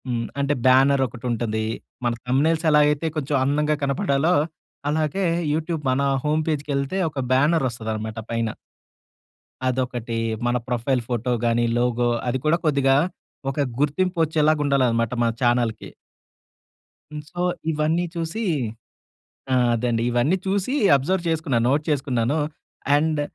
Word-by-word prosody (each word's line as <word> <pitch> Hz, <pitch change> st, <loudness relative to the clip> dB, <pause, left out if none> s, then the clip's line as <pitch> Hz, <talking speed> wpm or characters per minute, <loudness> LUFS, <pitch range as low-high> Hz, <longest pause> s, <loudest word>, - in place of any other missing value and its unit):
హ్మ్. 120 Hz, -2 st, -2 dB
అంటే 140 Hz, +1 st, +1 dB
బ్యానరొకటుంటది. 125 Hz, -4 st, +2 dB, 0.4 s
మన 120 Hz, -, +2 dB
థంబ్‌నెయిల్స్ 155 Hz, +6 st, +1 dB
ఎలాగైతే 150 Hz, +1 st, +3 dB
కొంచెం 145 Hz, -1 st, -1 dB
అందంగా 150 Hz, +2 st, +1 dB
కనపడాలో, 140 Hz, +2 st, +1 dB, 0.6 s
అలాగే 155 Hz, +5 st, 0 dB, 0.3 s
యూట్యూబ్ 160 Hz, 0 st, -2 dB
మన 130 Hz, +2 st, +1 dB, 0.2 s
హోమ్ 155 Hz, +1 st, +1 dB
పేజ్‌కెళ్తే, 145 Hz, +3 st, -1 dB
ఒక 145 Hz, -, -6 dB
బ్యానరొస్తదనమాట 115 Hz, -7 st, 0 dB
పైన. 115 Hz, -1 st, -1 dB, 1.2 s
అదొకటి. 125 Hz, -2 st, -2 dB, 0.3 s
మన 120 Hz, 0 st, +2 dB
ప్రొఫైల్ 125 Hz, +1 st, 0 dB
ఫోటోగాని, 120 Hz, -1 st, 0 dB
లోగో 120 Hz, 0 st, +1 dB, 0.2 s
అది 125 Hz, +1 st, +1 dB
కూడా 155 Hz, +2 st, +4 dB
కొద్దిగా 140 Hz, -3 st, +3 dB, 0.6 s
ఒక 145 Hz, -, -6 dB, 0.2 s
గుర్తింపు 175 Hz, +6 st, 0 dB
వచ్చేలాగా 155 Hz, -1 st, +2 dB
ఉండాలనమాట. 125 Hz, -4 st, +2 dB
మన 115 Hz, -, +2 dB
చానల్‌కి. 120 Hz, -3 st, 0 dB, 1.2 s
హ్మ్. 150 Hz, 0 st, -6 dB
సో, 175 Hz, -, -4 dB, 0.3 s
ఇవన్నీ 160 Hz, +3 st, 0 dB
చూసి 170 Hz, +7 st, -3 dB, 1.1 s
ఆ! -, -, +4 dB, 0.2 s
అదండి. 115 Hz, 0 st, 0 dB
ఇవన్నీ 120 Hz, +9 st, +2 dB
చూసి 200 Hz, +6 st, 0 dB, 0.2 s
అబ్జర్వ్ 170 Hz, +7 st, 0 dB
చేసుకున్నాను. 150 Hz, -8 st, 0 dB
నోట్ 145 Hz, +3 st, +2 dB
చేసుకున్నాను. 135 Hz, -2 st, 0 dB, 0.6 s
అండ్ 155 Hz, 0 st, +1 dB
140 Hz, 115 wpm, -23 LUFS, 120-155 Hz, 1.2 s, కూడా